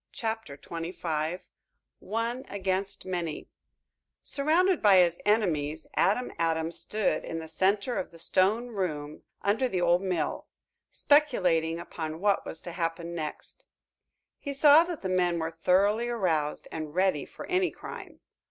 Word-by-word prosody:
CHAPTER 225 -10 -4
XXIV 165 0 -3 0.6
ONE 230 +5 -2
AGAINST 195 0 -2
MANY 175 -4 -3 0.8
Surrounded 330 +5 +2
by 205 -3 +6
his 175 -2 +4
enemies, 160 -8 +1
Adam 245 +6 +2
Adams 165 0 0
stood 215 -1 -1
in 165 - -5
the 160 0 -6
center 200 +8 +1
of - - -4
the 170 - -15
stone 205 +8 +1
room 155 -8 -3 0.2
under 220 +6 +2
the 190 -7 -1
old 175 0 +3
mill, 180 -6 -2 0.4
speculating 180 - +2
upon 160 -2 -6
what 200 +1 +1
was 160 - -6
to 175 - -7
happen 170 0 -3
next. 155 -3 -7 0.7
He 280 - -5
saw 295 +3 +7
that 345 -8 -6
the - - -1
men 180 -2 +1
were 160 0 -2
thoroughly 200 +8 +2
aroused 165 -10 0
and 155 -1 -6
ready 185 -6 +2
for - - -9
any 365 0 +1
crime. - - -10
185 Hz, 140 wpm, -28 LUFS, 165-220 Hz, 0.8 s, saw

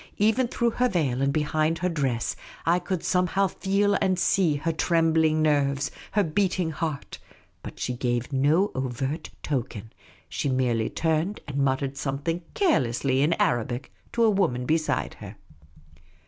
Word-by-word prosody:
Even 220 +5 +3
through 235 0 0
her 250 +2 +1
veil 140 - 0
and 140 0 +2
behind 155 +2 +1
her 180 - -1
dress, 135 -9 -1 0.3
I 170 +2 +3
could 180 -1 -3
somehow 185 +2 +2
feel 200 +2 +1
and 185 -1 +2
see 175 -3 +2
her 160 +3 -1
trembling 160 -1 +2
nerves, 140 -1 +1 0.2
her 205 - +3
beat 185 +4 0
ing 165 -3 0
heart. 155 -2 -4 0.4
But - - -9
she 125 - -2
gave 120 +1 -2
no 155 +9 +3
overt 130 +4 -3
token. 120 -6 -3 0.3
She 140 - -2
merely 125 -4 +1
turned 160 +5 0
and 140 -1 -4
muttered 135 0 0
something 145 +5 -2
carelessly 130 - +2
in 155 +4 +3
Arabic 120 -1 -1 0.2
to 235 - +2
a 225 - +6
woman 160 -12 +1
beside 155 +2 0
her. - - -8
155 Hz, 150 wpm, -26 LUFS, 135-180 Hz, 0.4 s, a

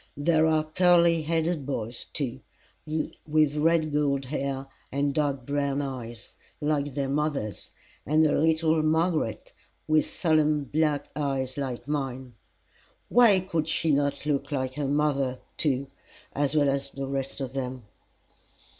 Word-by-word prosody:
There 160 +2 +3
are 155 -1 +3
curly 170 0 +4
headed 160 0 0
boys, 120 -4 -4
too, 130 -3 -2 0.9
with 155 -1 +3
red 155 0 +2
gold 140 -2 +1
hair 135 0 -3 0.3
and 140 +1 0
dark 140 -3 -1
brown 140 0 0
eyes 120 -5 -6 0.2
like 145 -2 -1
their 140 -2 -1
mother's, 140 -6 -2 0.3
and 155 +2 +3
a 150 - +3
little 160 0 +3
Margaret, 155 -6 0 0.3
with 155 -1 +3
solemn 155 -3 +2
black 145 0 0
eyes 135 -3 -1
like 135 -3 -4
mine. 130 -4 -3 0.8
Why 225 -6 +6
could 165 -4 -1
not - - -14
she 160 0 +1 0.4
look 140 +2 -2
like 130 -2 -1
her 145 0 -2
mother, 140 -3 +1 0.2
too, 140 -3 +1 0.5
as 145 +1 0
well 145 -2 +4
as 140 0 -1
the 135 0 -5
rest 135 0 -3
of 135 -2 -4
them? 130 -2 -4
145 Hz, 135 wpm, -27 LUFS, 135-155 Hz, 0.9 s, Why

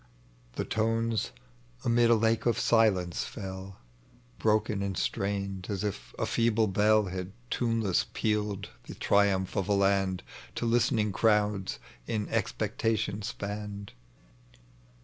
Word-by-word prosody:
The - - -3
tones 115 0 0 0.6
amid 120 0 +4
a 115 - +7
lake 115 +1 +2
of 120 - +2
sOcnee 100 -7 +3
fell 95 +1 -6 0.6
Broken 105 -2 +1
and 100 -2 -2
strained, 100 -1 -2
as 100 -1 -2
if - - -4
a - - 0
feeble 115 -1 +2
bell 105 +2 +3
Had 90 0 -5 0.2
tuneless 115 -5 +1
pealed 105 -2 -1 0.2
the - - -7
triumph 100 -2 +2
of 100 +1 -1
a - - +4
land 95 -2 +2 0.3
To - - -2
listening 115 -2 +2
crowds 105 -2 +1 0.3
in 105 -2 -1
expectation 110 -2 -1
spanned. 100 0 -5
105 Hz, 120 wpm, -29 LUFS, 95-110 Hz, 0.6 s, a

